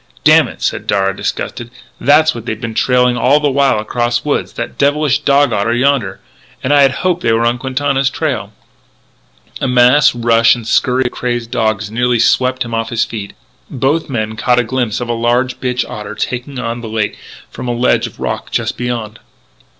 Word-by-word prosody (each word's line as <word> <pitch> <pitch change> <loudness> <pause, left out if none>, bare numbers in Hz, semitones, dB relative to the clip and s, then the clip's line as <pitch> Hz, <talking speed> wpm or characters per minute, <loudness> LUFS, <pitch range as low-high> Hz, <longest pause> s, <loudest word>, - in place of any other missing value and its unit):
"Damn - - +6
it," - - -10
said - - -2
Darragh, 95 -1 +1
disgusted, 120 +3 -4 0.2
" - - -31
that's 155 +4 +4
what 115 0 -9
they've 110 - -3
been 115 -2 -5
trailing 125 +1 +2
all 135 +5 +3
the 145 -1 +1
while 140 -3 +2
across 120 +3 -1
woods, 145 - -1
that - - -5
devilish 145 0 +2
dog 140 +1 +2
otter 115 +4 0
yonder.... 125 -6 0 0.4
And 130 - +1
I 145 - +5
had 135 -1 +5
hoped 180 -1 +1
they 115 - +1
were 115 +1 +1
on 120 +1 +1
Quintana's 135 +1 0
trail - - -3 0.6
" - - -19
A - - 0
mass 125 +2 +4
rush 115 -1 +4
and 120 -2 -9
scurry 125 +3 +1
of 125 - -1
crazed 120 -2 -3
dogs 110 -1 -1
nearly 120 +1 +1
swept 130 +2 +2
him 115 - -7
off 115 0 -2
his 115 0 0
feet, 105 -3 -7 0.4
and 135 - -8
both 145 +6 0
men 110 -4 -3
caught 115 +4 +1
a 120 - +3
glimpse 120 -2 -2
of 120 - -3
a 120 - -1
large 120 +2 0
bitch 125 -1 -2
otter 105 0 -7
taking 125 +5 -4
to 115 -2 -3
the 115 - -7
lake 110 -2 -2 0.4
from - - -7
a - - 0
ledge 120 -1 +2
of 110 - -15
rock - - -4
just - - -2
beyond. 115 -3 -4
120 Hz, 205 wpm, -15 LUFS, 115-130 Hz, 0.6 s, Damn